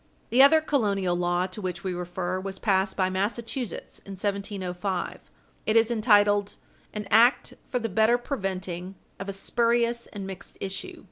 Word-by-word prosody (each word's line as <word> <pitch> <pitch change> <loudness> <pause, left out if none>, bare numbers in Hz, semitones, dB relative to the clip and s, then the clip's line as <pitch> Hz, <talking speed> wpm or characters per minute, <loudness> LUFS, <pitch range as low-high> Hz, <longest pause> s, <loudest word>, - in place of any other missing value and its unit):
The 250 +3 +6
other 315 +3 +7
colonial 200 - +1
law 175 0 +1
to 190 +3 -7
which 180 -1 -4
we 190 -1 -2
refer 180 +1 -3
was 190 0 -6
passed 190 -1 +1
by 185 -2 +2
Massachusetts 230 +5 -3
in 195 - -10
1705 195 -2 -2
(chap. - - -15
6). - - -32 0.4
It 215 - +2
is 225 +1 +4
entitled 205 -3 +3 0.4
"An 210 -1 -5
act 240 +4 +5 0.2
for 250 - 0
the 230 -2 -1
better 220 +4 +3
preventing 190 -7 -4 0.2
of 195 +1 -5
a - - -2
spurious 235 +3 +1
and 200 -2 -7
mixed 190 -1 -8
issue," 195 - -5
&c. - - -15
200 Hz, 175 wpm, -26 LUFS, 185-230 Hz, 0.4 s, other